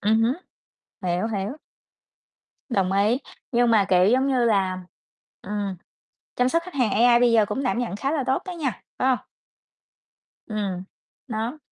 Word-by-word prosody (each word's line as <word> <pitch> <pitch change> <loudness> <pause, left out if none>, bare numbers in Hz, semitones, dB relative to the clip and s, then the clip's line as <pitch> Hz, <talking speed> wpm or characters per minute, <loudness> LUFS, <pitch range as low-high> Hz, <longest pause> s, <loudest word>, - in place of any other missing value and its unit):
Ừm 220 +2 +3
hứm, 235 +3 +2 0.7
hiểu, 180 +2 0
hiểu. 215 +5 -3 1.1
Đồng 195 -6 +1
ý, 205 +5 +3 0.3
nhưng 240 0 +3
mà, 215 -3 +5
kiểu, 180 -1 +5
giống 255 +5 +3
như 260 -3 +2
là, 195 -5 +2 0.6
ừm, 205 -2 -3 0.6
chăm 250 +1 +2
sóc 335 +4 +1
khách 365 0 -10
hàng 250 -6 +1
AI 240 +2 +5
bây 245 -1 +4
giờ 225 -2 +5
cũng 265 +7 -3
đảm 250 - 0
nhận 235 -6 -2
khá 270 +7 -1
là 300 -4 0
tốt 265 - +1
đó 365 - -5
nha, 305 -7 -1 0.3
phải 260 - +2
hông? 255 - +3 1.3
Ừm, 200 -4 -3 0.4
đó. 230 +5 -3
230 Hz, 165 wpm, -24 LUFS, 200-255 Hz, 1.3 s, mà